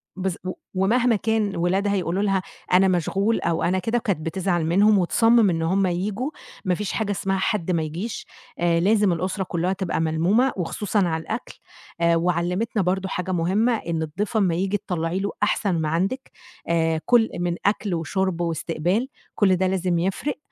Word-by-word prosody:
بالض 190 Hz, -1 st, -2 dB
و 185 Hz, -, -1 dB, 0.2 s
ومهما 230 Hz, +6 st, +2 dB
كان 215 Hz, -1 st, 0 dB
ولادها 190 Hz, +4 st, +1 dB
يقولوا 185 Hz, +1 st, -1 dB
لها 195 Hz, -2 st, +1 dB, 0.3 s
أنا 190 Hz, +1 st, +6 dB
مشغول 195 Hz, +5 st, +1 dB
أو 170 Hz, 0 st, 0 dB
أنا 185 Hz, +2 st, +1 dB
كده، 225 Hz, +6 st, 0 dB
كانت 200 Hz, -7 st, -1 dB
بتزعل 175 Hz, 0 st, 0 dB
منهم 200 Hz, +6 st, +4 dB
وتصمّم 225 Hz, +4 st, +4 dB
إن 165 Hz, -2 st, -1 dB
هم 190 Hz, +4 st, +2 dB
ييجوا، 205 Hz, -, -2 dB, 0.3 s
ما 185 Hz, -1 st, +2 dB
فيش 205 Hz, +1 st, -3 dB
حاجة 215 Hz, -2 st, -1 dB
اسمها 195 Hz, 0 st, -1 dB
حد 190 Hz, -2 st, 0 dB
ما 165 Hz, -2 st, +1 dB
يجيش، 175 Hz, +9 st, -5 dB, 0.3 s
آآ 170 Hz, -1 st, +2 dB
لازم 205 Hz, +1 st, +3 dB
الأسرة 185 Hz, +3 st, -2 dB
كُلّها 175 Hz, +1 st, -1 dB
تبقى 185 Hz, -4 st, -2 dB
ملمومة 175 Hz, +11 st, +2 dB
وخصوصًا 205 Hz, +4 st, -1 dB
على 160 Hz, -1 st, -1 dB
الأكل. 225 Hz, +7 st, -5 dB, 0.5 s
آآ 170 Hz, 0 st, +4 dB
وعلِّمتنا 180 Hz, +6 st, 0 dB
برضه 190 Hz, +1 st, -1 dB
حاجة 180 Hz, 0 st, -3 dB
مهمة، 190 Hz, +8 st, +2 dB
إن 165 Hz, -5 st, -3 dB
الضيف 195 Hz, +8 st, -2 dB
أمّا 185 Hz, -6 st, +2 dB
ييجي 195 Hz, +3 st, 0 dB
تطلَّعي 175 Hz, -1 st, -2 dB
له 200 Hz, +1 st, -2 dB
أحسَن 205 Hz, -2 st, +1 dB
ما 155 Hz, -, -1 dB
عندِك، 195 Hz, -, -2 dB, 0.4 s
آآ 165 Hz, -1 st, +1 dB
كل 235 Hz, -2 st, +4 dB
من 175 Hz, -1 st, -1 dB
أكل 205 Hz, -1 st, +1 dB
وشُرْب 175 Hz, +2 st, -1 dB
وإستقبال، 170 Hz, +6 st, -1 dB, 0.3 s
كل 190 Hz, -3 st, +4 dB
ده 185 Hz, +1 st, +1 dB
لازم 185 Hz, -2 st, 0 dB
يفرِق. 195 Hz, +11 st, -2 dB
185 Hz, 175 wpm, -23 LUFS, 170-205 Hz, 0.5 s, أنا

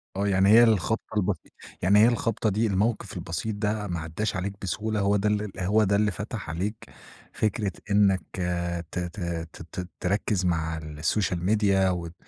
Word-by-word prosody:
آه 100 Hz, +1 st, 0 dB
يعني 95 Hz, 0 st, +3 dB
هي 115 Hz, +2 st, +8 dB
الخبطة 110 Hz, 0 st, +1 dB
البسيطة 90 Hz, -, -1 dB, 0.3 s
يعني 100 Hz, +4 st, +5 dB
هي 110 Hz, -, +7 dB
الخبطة 115 Hz, -2 st, 0 dB
دي، 110 Hz, +3 st, +1 dB
الموقِف 105 Hz, 0 st, -1 dB
البسيط 85 Hz, +5 st, -3 dB
ده 105 Hz, 0 st, -1 dB
ما 85 Hz, -2 st, -3 dB
عداش 80 Hz, +8 st, -3 dB
عليك 95 Hz, +2 st, -2 dB
بسهولة 105 Hz, +3 st, -2 dB
هو 100 Hz, +1 st, +2 dB
ده 105 Hz, 0 st, 0 dB
هو 105 Hz, +4 st, +3 dB
ده 100 Hz, 0 st, +2 dB
اللي 105 Hz, 0 st, +2 dB
فتح 105 Hz, -1 st, -6 dB
عليك 95 Hz, +8 st, -2 dB, 0.6 s
فكرة 105 Hz, -2 st, 0 dB, 0.2 s
إنّك 100 Hz, -2 st, +4 dB, 0.2 s
آآ، 85 Hz, -1 st, -1 dB
ت -, -, -3 dB
ت 90 Hz, +4 st, -5 dB, 0.3 s
ت -, -, -11 dB, 0.2 s
ت 90 Hz, 0 st, -5 dB
تركز 95 Hz, 0 st, 0 dB
مع 80 Hz, -2 st, 0 dB
السوشيال 80 Hz, +4 st, -1 dB
ميديا 100 Hz, -2 st, +3 dB
وت 85 Hz, -2 st, -3 dB
100 Hz, 170 wpm, -26 LUFS, 90-105 Hz, 0.6 s, هي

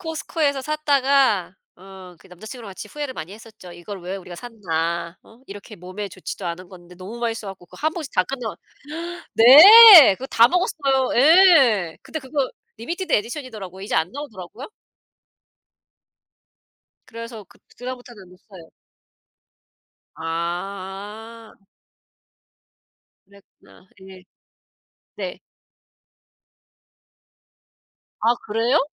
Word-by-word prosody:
Costco에서 315 Hz, -4 st, -3 dB
샀다가 275 Hz, -, 0 dB, 0.2 s
어 190 Hz, -1 st, -14 dB
그 -, -, -21 dB
남자친구랑 215 Hz, +4 st, -11 dB
같이 190 Hz, -, -10 dB
후회를 290 Hz, -1 st, -7 dB
많이 160 Hz, +4 st, -8 dB
했었죠. 215 Hz, -4 st, -14 dB
'이걸 180 Hz, +3 st, -10 dB
왜 185 Hz, +3 st, -6 dB
우리가 180 Hz, -2 st, -11 dB
샀나.' 170 Hz, -6 st, -5 dB
어 225 Hz, +2 st, -21 dB
이렇게 205 Hz, +2 st, -11 dB
몸에 185 Hz, +3 st, -8 dB
좋지도 185 Hz, 0 st, -8 dB
않은 175 Hz, +2 st, -7 dB
건데 180 Hz, -1 st, -16 dB
너무 190 Hz, +6 st, -10 dB
맛있어 225 Hz, -3 st, -4 dB
가지고 185 Hz, -2 st, -12 dB
그거 -, -, -17 dB
한 315 Hz, +1 st, -1 dB
봉지 325 Hz, -5 st, -7 dB
다 185 Hz, -, +2 dB
끝나 240 Hz, -1 st, -6 dB, 0.8 s
네 335 Hz, -, +9 dB
그거 255 Hz, -, -8 dB
다 230 Hz, +1 st, +4 dB
먹었어요. 275 Hz, -8 st, -1 dB
예. 275 Hz, -, +4 dB
근데 315 Hz, -, -7 dB
그거 270 Hz, -1 st, -3 dB, 0.3 s
리미티드 340 Hz, -, -5 dB
에디션이더라고요. 215 Hz, -, -4 dB
이제 200 Hz, -, -4 dB
안 160 Hz, +4 st, -1 dB
나오더라고요. 245 Hz, -3 st, -10 dB, 2.4 s
그래서 230 Hz, -2 st, -10 dB
그 -, -, -24 dB, 0.2 s
그다음부터는 245 Hz, -6 st, -10 dB
못 180 Hz, 0 st, -19 dB
사요. 175 Hz, -5 st, -15 dB, 1.4 s
아. 195 Hz, +7 st, -7 dB, 1.7 s
그랬구나. 200 Hz, -1 st, -23 dB
예. 190 Hz, -1 st, -14 dB, 0.9 s
네. -, -, -6 dB, 2.8 s
아 230 Hz, +3 st, +2 dB
그래요? 230 Hz, +7 st, 0 dB
215 Hz, 255 characters per minute, -21 LUFS, 185-265 Hz, 2.8 s, 네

